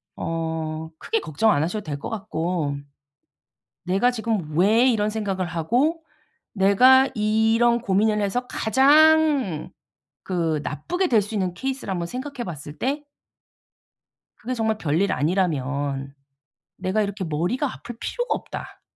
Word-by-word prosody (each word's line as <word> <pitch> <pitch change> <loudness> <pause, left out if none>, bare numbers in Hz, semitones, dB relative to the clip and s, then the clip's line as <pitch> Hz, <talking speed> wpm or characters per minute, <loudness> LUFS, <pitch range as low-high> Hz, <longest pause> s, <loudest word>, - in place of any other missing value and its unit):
어 160 -1 -3
크게 - - -1
걱정 155 +9 +1
안 145 - +2
하셔도 200 +6 -3
될 145 -4 -5
것 - - -6
같고 175 -8 -2 1.1
내가 195 +7 +2
지금 215 -10 -3
왜 215 +7 +5
이런 215 -4 +2
생각을 200 -4 -2
하고 245 - 0 0.5
내가 255 +7 +5
이런 225 +2 +2
고민을 210 0 +2
해서 225 +5 -1
가장 285 - +3 0.5
그 165 -4 -1
나쁘게 355 - -2
될 225 -9 +4
수 210 +2 -6
있는 185 -3 -1
케이스를 265 +2 -4
한번 175 -2 -2
생각해 255 +3 -5
봤을 150 -3 -8
때 285 +4 -1 1.3
그게 255 - -4
정말 220 -2 0
별일 170 +3 0
아니라면 140 -4 -1 0.6
내가 190 +3 0
이렇게 200 -1 -3
머리가 180 - -1
아플 240 -1 -9
필요가 485 0 -2
없다. - - -8
205 Hz, 255 characters per minute, -23 LUFS, 165-240 Hz, 1.3 s, 왜